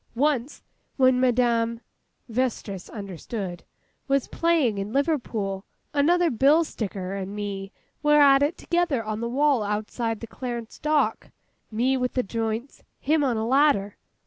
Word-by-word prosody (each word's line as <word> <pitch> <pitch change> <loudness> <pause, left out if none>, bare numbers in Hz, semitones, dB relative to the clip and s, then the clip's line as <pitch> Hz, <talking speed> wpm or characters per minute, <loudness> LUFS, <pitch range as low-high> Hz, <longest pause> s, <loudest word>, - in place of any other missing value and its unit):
Once, 275 0 0 0.3
when 260 -2 +4
Madame' 235 -2 +2 0.5
(Vestris, 225 -6 -2
understood) 195 -2 -6 0.4
'was 275 -1 +1
playing 310 -11 +1
in 200 +2 -4
Liverpool, 235 -9 -1 0.3
another 335 +4 +3
bill 280 +7 +4
sticker 195 - -5
and 195 0 -5
me 200 -1 -5 0.3
were 295 0 +5
at 275 -1 +6
it 290 +4 +1
together 340 -9 0
on 215 0 -3
the 235 - -2
wall 280 -1 +2
outside 215 +2 -2
the - - -6
Clarence 235 -1 -6
Dock—me 265 -3 -1
with 250 -1 -1
the 255 - +1
joints—him 230 +7 -2
on 250 -5 +1
a 220 - -1
ladder. 255 -6 +3
240 Hz, 130 wpm, -25 LUFS, 215-280 Hz, 0.5 s, at